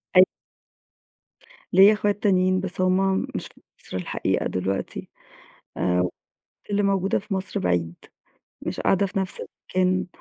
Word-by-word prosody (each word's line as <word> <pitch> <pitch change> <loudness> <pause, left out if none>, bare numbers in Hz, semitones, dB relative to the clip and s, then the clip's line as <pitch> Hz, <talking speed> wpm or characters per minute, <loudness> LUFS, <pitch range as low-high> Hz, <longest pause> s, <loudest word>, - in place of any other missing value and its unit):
أي 185 - +10 1.5
ليّا 195 +3 +8
إخوات 205 0 -1
تانيين، 185 -2 +3
بس 185 -1 -3
هم 190 +1 +2
مش - - -3
في - - -22 0.2
مصر - - -4
الحقيقة 90 - -1
دلوقتي، 95 +1 -3 0.7
آآ 90 0 +1 0.6
اللي 205 0 +1
موجودة 195 -1 +1
في 200 +1 -6
مصر 190 0 -2
بعيد، 85 -2 0 0.7
مش - - -4
قاعدة 195 +1 +2
في 195 +1 -3
نَفْس 190 -1 -1 0.4
المكان. 185 0 +2
185 Hz, 130 wpm, -24 LUFS, 175-195 Hz, 1.5 s, أي